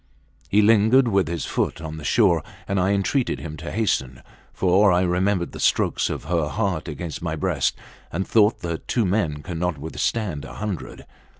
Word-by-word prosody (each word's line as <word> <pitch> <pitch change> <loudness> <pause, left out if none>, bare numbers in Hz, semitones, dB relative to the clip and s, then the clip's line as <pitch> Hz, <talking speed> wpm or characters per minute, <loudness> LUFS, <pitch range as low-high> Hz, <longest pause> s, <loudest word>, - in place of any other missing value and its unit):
He 105 +2 +4
lingered 115 +4 +5
with 95 -5 +2
his 85 0 -3
foot - - -1
on 80 -1 -6
the 75 - -8
shore, 90 -4 +3 0.3
and 100 0 0
I 90 +1 +2
entreated 100 +7 0
him 75 -2 -7
to 80 +3 -6
hasten, 65 - -1 0.3
for 95 +2 +3
I 90 0 +3
remembered 90 0 0
the - - -9
strokes - - +1
of - - -4
her 85 -4 0
heart 95 -3 -2
against 80 +2 -5
my 85 -2 -2
breast 75 - 0 0.3
and 95 +4 -2
thought 110 0 +3
that 85 -2 -5
two 115 -4 +1
men 85 -7 0
cannot 90 -2 -2
withstand 80 +2 -2
a 70 0 -9
hundred. 100 -7 -5
90 Hz, 180 wpm, -23 LUFS, 80-105 Hz, 0.3 s, lingered